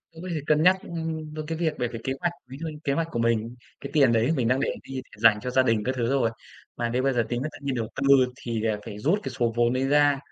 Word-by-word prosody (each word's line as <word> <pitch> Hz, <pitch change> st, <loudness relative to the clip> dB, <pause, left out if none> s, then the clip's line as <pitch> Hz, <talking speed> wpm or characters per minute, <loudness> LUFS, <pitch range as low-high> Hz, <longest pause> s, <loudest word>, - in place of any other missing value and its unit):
tớ 160 Hz, -, -16 dB
có 185 Hz, -, -6 dB
thể 155 Hz, -, -2 dB
cân 155 Hz, 0 st, +3 dB
nhắc, 185 Hz, +2 st, +6 dB
ừm, 160 Hz, -2 st, -5 dB
đến 155 Hz, -1 st, -5 dB
cái 160 Hz, +1 st, -3 dB
việc 160 Hz, -3 st, 0 dB
bởi 120 Hz, -, 0 dB
vì 115 Hz, -1 st, -6 dB
kế 135 Hz, -, 0 dB
hoạch 175 Hz, -1 st, 0 dB, 0.2 s
ví 135 Hz, -, -8 dB
dụ 165 Hz, +1 st, -4 dB
như 155 Hz, -1 st, -8 dB
kế 140 Hz, -, +1 dB
hoạch 165 Hz, +3 st, 0 dB
của 120 Hz, -, -3 dB
mình, 115 Hz, 0 st, 0 dB, 0.3 s
cái -, -, -7 dB
tiền 135 Hz, -6 st, +5 dB
đấy 115 Hz, +6 st, +2 dB
mình 120 Hz, -4 st, +1 dB
đang 130 Hz, +2 st, +2 dB
để -, -, +1 dB
đi 135 Hz, -, -10 dB
để 130 Hz, -, -6 dB
dành 105 Hz, -1 st, +5 dB
cho 125 Hz, -, -4 dB
gia 130 Hz, +1 st, +4 dB
đình 115 Hz, -4 st, +1 dB
các 130 Hz, -, -1 dB
thứ 120 Hz, -2 st, -1 dB
rồi. 130 Hz, -4 st, +2 dB, 0.5 s
Mà 120 Hz, -1 st, -1 dB
nếu 125 Hz, +2 st, 0 dB
bây 135 Hz, 0 st, +2 dB
giờ 120 Hz, -, +2 dB
tính 120 Hz, 0 st, -2 dB
tự 155 Hz, -, -5 dB
nhiên 135 Hz, -2 st, -1 dB
đầu 115 Hz, -3 st, -2 dB
tư 135 Hz, -, -2 dB, 0.3 s
thì 115 Hz, -3 st, -4 dB
là 110 Hz, -1 st, 0 dB
phải 105 Hz, -3 st, -7 dB
rút 160 Hz, -, +2 dB
cái -, -, -4 dB
số 120 Hz, -2 st, 0 dB
vốn 120 Hz, 0 st, +3 dB
đấy 130 Hz, +1 st, 0 dB
ra 145 Hz, -1 st, +4 dB
130 Hz, 310 wpm, -26 LUFS, 115-155 Hz, 0.5 s, nhắc